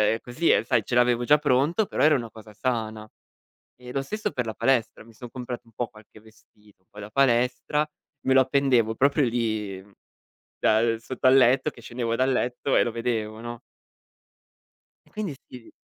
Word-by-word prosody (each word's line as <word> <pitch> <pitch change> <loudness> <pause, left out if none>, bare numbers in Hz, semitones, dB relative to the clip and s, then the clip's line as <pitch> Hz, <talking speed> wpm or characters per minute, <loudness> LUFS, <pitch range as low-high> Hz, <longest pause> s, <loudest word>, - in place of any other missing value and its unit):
e - - -6
così, 125 +9 -1
e - - +4
sai 120 -5 +1
ce 120 - -3
l'avevo 120 0 +3
già 150 +4 +6
pronto, 150 - +2
però - - -3
era 155 0 +5
una 115 -4 -4
cosa 110 -1 -13
sana. 110 -1 -3 0.7
E 125 0 -10
lo 135 - 0
stesso 215 +10 -4
per 125 - -2
la 110 - -4
palestra: 120 -3 0
mi 115 - -17
son 120 +2 -10
comprato 125 -1 -6
un - - -20
po' 120 +2 -3
qualche 110 -1 -18
vestito 105 -3 -23
poi 105 - -13
da 105 0 -8
palestra, 125 +4 +1 0.4
me 130 - +3
lo 135 - +6
appendevo, 130 -4 +2
proprio 140 +4 +3
lì, 110 -5 -2 0.8
da 110 - +3
uhm, 115 -1 +1
sotto 130 +3 -7
al 130 +1 +7
letto, 130 +3 +4
che 120 - -16
scendevo 115 0 -3
dal 130 +2 +1
letto 125 +2 -1
e - - +5
lo 120 - -2
vedevo, 110 -2 -3
no? 120 0 -7 1.5
E - - -23
quindi 210 -7 -4 0.2
sì 125 -2 -12
120 Hz, 190 wpm, -25 LUFS, 110-130 Hz, 1.5 s, al